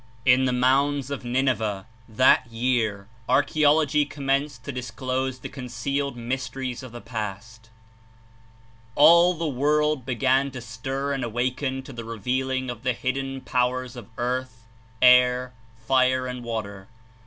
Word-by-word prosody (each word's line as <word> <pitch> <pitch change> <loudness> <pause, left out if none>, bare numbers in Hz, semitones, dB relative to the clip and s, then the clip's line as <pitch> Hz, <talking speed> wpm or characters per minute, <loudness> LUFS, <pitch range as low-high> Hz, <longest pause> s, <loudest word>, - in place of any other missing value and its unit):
In 130 +1 +5
the 130 - +1
mounds 135 +2 +1
of 140 - -4
Nineveh, 120 -6 0 0.2
that 130 +2 +4
year, 115 -4 -1 0.2
archaeology 150 +2 +3
commenced 140 0 -2
to 140 - -5
disclose 130 0 -3
the - - -7
concealed 135 +2 -3
mysteries 125 +1 -4
of 130 -2 -10
the 120 0 -9
past. 115 0 -7 1.3
All 170 +4 +7
the 165 0 -2
world 150 +1 +1
began 130 +2 +1
to 130 - -6
stir 135 +5 -4
and 135 -2 -3
awaken 130 +3 -2
to 135 - -10
the 115 -1 -7
re 115 0 -7
vealing 130 +3 -1
of 120 -2 -9
the 125 0 0
hidden 135 +2 -3
powers 125 -1 -1
of 120 -3 -10
earth, 125 -1 -3 0.4
air, 125 0 +5 0.3
fire 130 0 +2
and 125 -1 -5
water. 100 -4 -5
130 Hz, 135 wpm, -25 LUFS, 120-135 Hz, 1.3 s, All